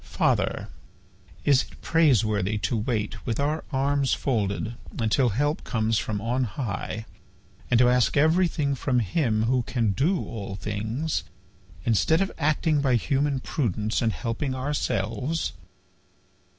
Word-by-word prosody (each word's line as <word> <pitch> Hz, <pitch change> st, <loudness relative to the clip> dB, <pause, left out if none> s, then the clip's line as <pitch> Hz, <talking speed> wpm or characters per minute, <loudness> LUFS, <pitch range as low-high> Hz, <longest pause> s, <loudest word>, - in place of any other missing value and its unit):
"Father, -, -, 0 dB, 0.8 s
is 140 Hz, -3 st, +5 dB
it -, -, -11 dB
praiseworthy 110 Hz, -, +2 dB
to 120 Hz, -, -1 dB
wait, 105 Hz, -1 st, -2 dB
with 115 Hz, -3 st, -2 dB
our 150 Hz, +3 st, 0 dB
arms 140 Hz, 0 st, +1 dB
folded, 110 Hz, -3 st, -1 dB, 0.2 s
until 120 Hz, +3 st, +2 dB
help 145 Hz, -, 0 dB
comes 110 Hz, -1 st, 0 dB
from 105 Hz, -2 st, -3 dB
on 125 Hz, +4 st, 0 dB
high, 110 Hz, -1 st, -4 dB, 0.6 s
and 125 Hz, -, +4 dB
to 120 Hz, +1 st, +6 dB
ask 125 Hz, +1 st, +3 dB
everything 160 Hz, -2 st, +3 dB
from 130 Hz, -1 st, 0 dB
Him 110 Hz, -, +1 dB
who 125 Hz, +2 st, +2 dB
can 115 Hz, -3 st, 0 dB
do 165 Hz, -, +1 dB
all 100 Hz, -3 st, -6 dB
things, 110 Hz, -, -2 dB, 0.6 s
instead 120 Hz, +8 st, +3 dB
of 195 Hz, 0 st, 0 dB
acting 150 Hz, 0 st, +2 dB
by 130 Hz, -3 st, +3 dB
human 140 Hz, +2 st, 0 dB
prudence 110 Hz, -, -1 dB
and 115 Hz, -2 st, +2 dB
helping 130 Hz, +4 st, -3 dB
ourselves? 130 Hz, +1 st, -1 dB
125 Hz, 130 wpm, -26 LUFS, 110-145 Hz, 0.8 s, to